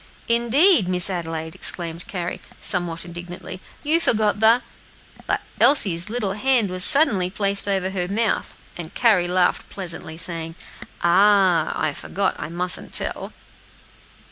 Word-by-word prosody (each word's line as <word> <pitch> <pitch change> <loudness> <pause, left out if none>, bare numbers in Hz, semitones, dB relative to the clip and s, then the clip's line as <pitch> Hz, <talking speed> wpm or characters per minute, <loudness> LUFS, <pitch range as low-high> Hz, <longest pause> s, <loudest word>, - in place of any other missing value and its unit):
"Indeed, 235 - +4
Miss 180 +1 +3
Adelaide!" 165 -2 -5
exclaimed 170 -1 -4
Carry, 175 -3 -5 0.2
somewhat 175 -3 +1
indignantly, 175 +1 -8 0.2
"you 310 +3 +3
forget 215 -8 +1
the 225 +3 +4 0.3
" - - -24
But - - -1 0.2
Elsie's 190 - +3
little 220 -4 -2
hand 235 -2 +1
was 185 0 -1
suddenly 245 - +4
placed 200 +1 +1
over 190 -1 -1
her 180 -2 -3
mouth, 215 +3 -2 0.2
and 165 -2 -9
Carry 215 -8 +3
laughed 180 0 0
pleasantly, 170 -4 -7
saying, 165 -1 -5 0.5
"Ah! 185 -2 +3
I 155 - -1
forgot, 200 +6 -2
I - - -6
mustn't 180 +2 -3
tell." - - -1
185 Hz, 135 wpm, -21 LUFS, 175-215 Hz, 0.5 s, Indeed